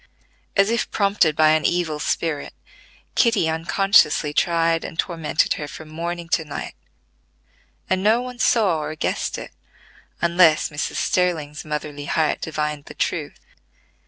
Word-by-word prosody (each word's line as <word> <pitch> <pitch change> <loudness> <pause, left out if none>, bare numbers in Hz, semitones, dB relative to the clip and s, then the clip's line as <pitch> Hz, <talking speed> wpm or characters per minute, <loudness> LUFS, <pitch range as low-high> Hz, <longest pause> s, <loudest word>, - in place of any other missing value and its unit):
As 195 +2 +4
if 235 - 0
prompted 195 -6 +2
by 155 0 +5
an 155 0 +3
evil 170 -4 0
spirit, 150 0 -2 0.6
Kitty 230 -8 +3
unconsciously 160 -2 +3
tried 165 0 +1
and 165 - -7
tormented 165 -4 0
her 145 - -4
from 155 +2 -10
morning 170 +2 -5
to 165 - +1
night, 150 - -6 1.1
and 185 0 0
no 215 +4 +4
one 250 0 -7
saw 200 -11 +3
or 155 +1 -4
guessed - - -2
it - - -8 0.7
unless 170 -2 +4
Mrs. 145 -1 -4
Sterling's 160 -5 0
motherly 150 -1 -5
heart 155 +1 0
divined 150 -2 -3
the - - -11
truth. - - -3
165 Hz, 135 wpm, -22 LUFS, 150-180 Hz, 1.1 s, by